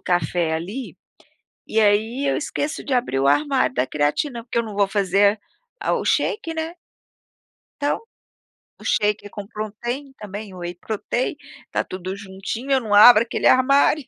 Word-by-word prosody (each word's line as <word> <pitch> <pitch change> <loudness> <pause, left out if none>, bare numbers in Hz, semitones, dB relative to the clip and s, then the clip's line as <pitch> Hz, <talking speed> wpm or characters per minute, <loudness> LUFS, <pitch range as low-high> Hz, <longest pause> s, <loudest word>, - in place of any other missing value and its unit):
café 175 -1 0
ali, 195 +11 -5 0.7
e 220 - +1
aí 220 +6 +2
eu - - +1
esqueço 300 +1 -3
de 275 - -2
abrir 240 - 0
o 135 - +2
armário 275 - +2
da 125 +1 0
creatina, 230 - -1
porque 235 - -4
eu 235 - 0
não 215 -2 -7
vou 200 -1 +3
fazer 200 +1 +2 0.4
a - - 0
o - - -1
shake 335 -6 0
né. 320 +1 -4 1.1
Então, 290 +1 0 0.8
o - - -14
shake, 210 -1 0
com 205 -1 -8
protrein 240 +6 -5
também, 205 -1 -8
o 180 - -10
whey 175 0 -5
protein, 215 +6 -3 0.3
está - - -2
tudo 185 +1 -6
juntinho, 200 +6 -6
eu 270 - +5
não 215 -3 -3
abro 215 +2 +9
aquele 235 - 0
armário. 275 +2 +4
215 Hz, 160 wpm, -22 LUFS, 195-255 Hz, 1.1 s, abro